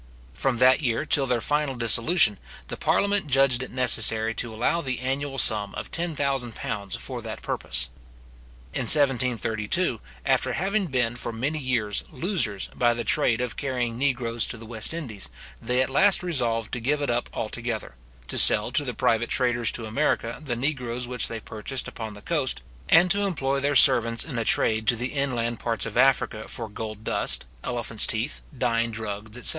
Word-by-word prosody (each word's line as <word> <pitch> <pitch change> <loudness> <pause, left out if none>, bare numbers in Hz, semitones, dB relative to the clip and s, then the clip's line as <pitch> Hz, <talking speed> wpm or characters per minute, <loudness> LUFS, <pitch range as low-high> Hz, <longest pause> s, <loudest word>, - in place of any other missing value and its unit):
From 130 -3 -1
that 130 +4 +5
year 120 0 -1
till 140 -2 +2
their 125 -2 0
final 150 0 0
dissolution, 115 - +3 0.3
the - - -3
parliament 200 -4 0
judged 135 -2 +3
it 130 - -6
necessary 110 -3 +3
to 115 0 -3
allow 120 +10 0
the 130 -4 -2
annual 135 +2 -3
sum 105 -5 +4
of - - -7
£10,000 135 - -2
for - - -6
that - - -8
purpose. 60 +1 -1 0.8
In 130 - -2
1732, 125 - +4 0.2
after - - +1
having 195 +2 -1
been 120 -4 -1
for 120 - -4
many 135 +8 -3
years 120 -7 -1
losers 165 - -2
by 120 -1 +2
the 120 - -3
trade 115 +2 +1
of 125 -3 -3
carrying 125 -4 -2
negroes 120 -3 0
to 115 - -5
the 115 - -11
West 110 -1 -3
Indies, 130 - -5 0.3
they 125 +1 +1
at - - -4
last 195 0 +4
resolved 120 -10 -1
to 125 - -3
give 140 +6 0
it 140 - 0
up 120 0 -2
altogether; 115 - -4 0.3
to - - -1
sell - - +4
to - - +1
the - - -5
private 115 +1 +1
traders 120 -3 +1
to 115 - -3
America 115 0 -1
the 125 -5 -3
negroes 125 -2 -3
which 125 -3 +1
they 115 - -5
purchased 110 +5 -4
upon 110 -2 -7
the 105 - -13
coast; 150 - -1 0.3
and 175 +2 +5
to 200 0 +2
employ 140 -9 -1
their 140 +1 0
servants 115 -4 +5
in 130 -7 -4
a 115 - -2
trade 110 0 +2
to 120 - +4
the 125 +3 -4
inland 120 -5 -2
parts 115 -4 -2
of - - -7
Africa 130 -5 +2
for 115 - -3
gold 110 0 -7
dust, - - 0 0.2
elephants 120 -2 0
teeth, 115 +6 -1 0.2
dyeing 115 -1 0
drugs, 110 0 -6
etc. 125 - +2
120 Hz, 180 wpm, -25 LUFS, 115-140 Hz, 0.8 s, that